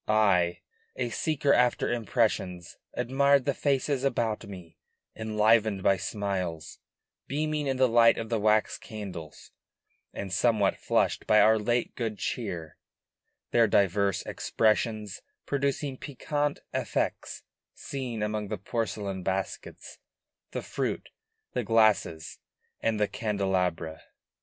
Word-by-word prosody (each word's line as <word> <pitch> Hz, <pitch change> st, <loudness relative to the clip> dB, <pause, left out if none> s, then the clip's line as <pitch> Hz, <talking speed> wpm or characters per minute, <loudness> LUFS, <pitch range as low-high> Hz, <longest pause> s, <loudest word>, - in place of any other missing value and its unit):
I, 95 Hz, -5 st, +3 dB, 0.3 s
a -, -, -2 dB
seeker 145 Hz, -3 st, +1 dB
after 125 Hz, -1 st, +2 dB
impressions, 105 Hz, -7 st, -1 dB, 0.2 s
admired 135 Hz, +2 st, +3 dB
the 140 Hz, -, +1 dB
faces 140 Hz, -1 st, 0 dB
about 115 Hz, -6 st, 0 dB
me, 90 Hz, -5 st, -11 dB, 0.4 s
enlivened 110 Hz, -2 st, +2 dB
by 95 Hz, -, +4 dB
smiles, 95 Hz, -5 st, -3 dB, 0.5 s
beaming 150 Hz, 0 st, -1 dB
in 135 Hz, -1 st, 0 dB
the 130 Hz, 0 st, +5 dB
light 115 Hz, 0 st, +5 dB
of 115 Hz, -1 st, -4 dB
the 115 Hz, -2 st, 0 dB
wax 105 Hz, 0 st, +2 dB
candles, 95 Hz, -8 st, -8 dB, 0.6 s
and 95 Hz, -2 st, -6 dB
somewhat 105 Hz, -2 st, +2 dB
flushed -, -, 0 dB
by 105 Hz, -, +6 dB
our 110 Hz, +1 st, +5 dB
late 120 Hz, +3 st, 0 dB
good 115 Hz, -3 st, -3 dB
cheer; 85 Hz, -9 st, -4 dB, 0.7 s
their 115 Hz, -1 st, +5 dB
diverse 100 Hz, -1 st, +2 dB
expressions 110 Hz, -2 st, 0 dB, 0.2 s
producing 140 Hz, -1 st, -1 dB
piquant 145 Hz, +2 st, -2 dB
effects -, -, -2 dB, 0.3 s
seen 125 Hz, -6 st, -4 dB
among 105 Hz, 0 st, -2 dB
the 105 Hz, +1 st, -3 dB
porcelain 100 Hz, -2 st, -3 dB
baskets, 95 Hz, +1 st, -4 dB, 0.5 s
the -, -, -5 dB
fruits, -, -, -3 dB, 0.4 s
the 125 Hz, -, -1 dB
glasses, 110 Hz, -7 st, +2 dB, 0.4 s
and 110 Hz, -1 st, 0 dB
the 105 Hz, -, +2 dB
candelabra. 90 Hz, -7 st, -1 dB
110 Hz, 115 wpm, -28 LUFS, 100-125 Hz, 0.7 s, by